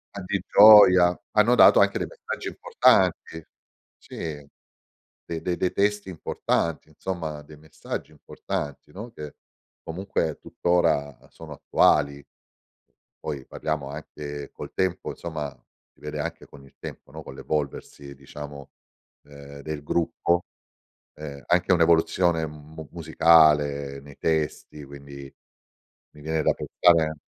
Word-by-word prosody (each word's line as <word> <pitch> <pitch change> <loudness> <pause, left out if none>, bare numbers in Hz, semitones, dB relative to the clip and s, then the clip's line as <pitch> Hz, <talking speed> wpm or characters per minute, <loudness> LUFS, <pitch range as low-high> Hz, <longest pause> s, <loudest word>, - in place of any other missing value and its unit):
A 100 - -5
di 100 +2 -2
gioia, 95 -4 +8
hanno 110 +3 +4
dato - - +7
anche - - +3
dei - - -2
messaggi - - -7
importanti, 80 0 +1 0.5
sì - - -14 1.1
de 80 -1 -6
de 90 -1 -1
dei 90 - 0
testi 105 -1 0
importanti 85 -2 -2
insomma, 80 -2 -5
dei 75 +1 -14
messaggi 80 +1 -7
importanti, 75 -7 -6
no, 110 +8 -9
che 75 -9 -9 0.5
comunque 80 -3 -3
tuttora 70 -5 0
sono 80 -2 -13
attuali, 70 0 +2 0.9
poi 70 -3 -6
parliamo 75 -3 -4
anche 75 -1 -8
col - - -9
tempo 95 -1 -1
insomma, 75 -4 -5 0.4
si - - -32
vede 75 0 -5
anche - - -5
con 70 -1 -15
il - - -21
tempo - - -10
no, - - -8
con - - -10
l'evolversi 70 -1 -5
diciamo, 70 0 -10 0.5
ehm, 70 0 -12
del 75 -1 -6
gruppo, 85 +2 0 0.7
ehm, 70 -2 -9
anche 90 +2 +2
un'evoluzione 85 0 +3
mu 75 +1 -11
musicale 75 -4 +3
nei 70 0 -15
testi 75 -2 -2
quindi 70 0 -11 0.8
mi 75 - -15
viene 80 +1 -1
da - - +3
pensare 80 -3 +2
80 Hz, 125 wpm, -25 LUFS, 70-85 Hz, 1.1 s, gioia